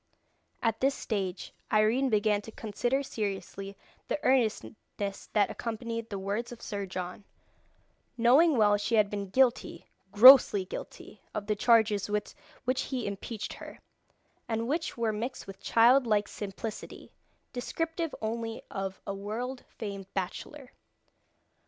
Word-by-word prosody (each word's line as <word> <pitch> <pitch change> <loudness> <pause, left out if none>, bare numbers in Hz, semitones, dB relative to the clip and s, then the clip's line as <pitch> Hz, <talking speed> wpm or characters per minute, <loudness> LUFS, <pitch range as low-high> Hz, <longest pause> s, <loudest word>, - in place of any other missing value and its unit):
At 225 -2 +1
this 275 +1 +2
stage 190 -4 -4 0.2
Irene 225 +5 +3
began 210 -2 +2
to 225 - -10
consider 240 +6 -1
seriously 200 -4 -5 0.3
the - - -1
earnestness 215 -5 -1
that 205 -1 +3
accompanied 230 0 -4
the 200 - -4
words 200 +5 -3
of 240 - -9
Sir 200 -2 -5
John, 185 +2 -6 0.9
knowing 270 +6 +5
well 205 -2 +5
she 210 +3 0
had 210 -2 +3
been 200 -2 -4
guilty, 255 +3 +1 0.3
grossly 215 -3 +9
guilty, - - -9
of 210 - -3
the 210 0 0
charges 215 -3 +3
with 210 0 -2 0.3
which 255 +1 +1
he 255 -4 -3
impeached 205 +2 -5
her, - - -10 0.7
and 225 0 -2
which 315 +1 -2
were 230 -2 0
mixed 235 +5 -4
with 195 -2 -10
child 245 +3 +5
like 210 -2 +2
simplicity, 210 +2 -7 0.4
descriptive 325 +5 -3
only 225 +1 -3
of 195 -1 -4
a 200 - -3
world 230 +6 -5
famed 195 -3 -7
bachelor. 250 +8 -5
220 Hz, 135 wpm, -29 LUFS, 200-245 Hz, 0.9 s, grossly